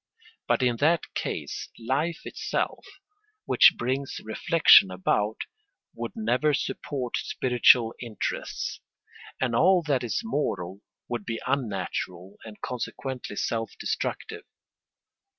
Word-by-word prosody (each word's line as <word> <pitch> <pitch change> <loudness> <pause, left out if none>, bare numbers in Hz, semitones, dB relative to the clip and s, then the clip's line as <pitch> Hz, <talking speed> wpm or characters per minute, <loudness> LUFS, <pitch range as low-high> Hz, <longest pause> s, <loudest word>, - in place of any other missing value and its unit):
But - - +2
in 120 -2 +2
that 160 +4 +1
case - - -4
life 140 +8 -1
itself, - - -3 0.6
which - - +6
brings 130 +3 -2
reflection 110 - +6
about, 105 +3 0 0.6
would - - -5
never 150 - +1
support 130 -3 -3
spiritual 120 -2 +3
interests, 115 -3 -4 0.6
and 125 -3 0
all 180 +6 +5
that 140 -5 0
is 120 - -1
moral 100 - -2 0.3
would 120 -3 -3
be 115 +2 -4
unnatural 100 -7 -3
and 110 -2 -11
consequently 125 -1 -5
self 115 +2 -2
destructive. - - -3
125 Hz, 105 wpm, -27 LUFS, 110-140 Hz, 0.6 s, which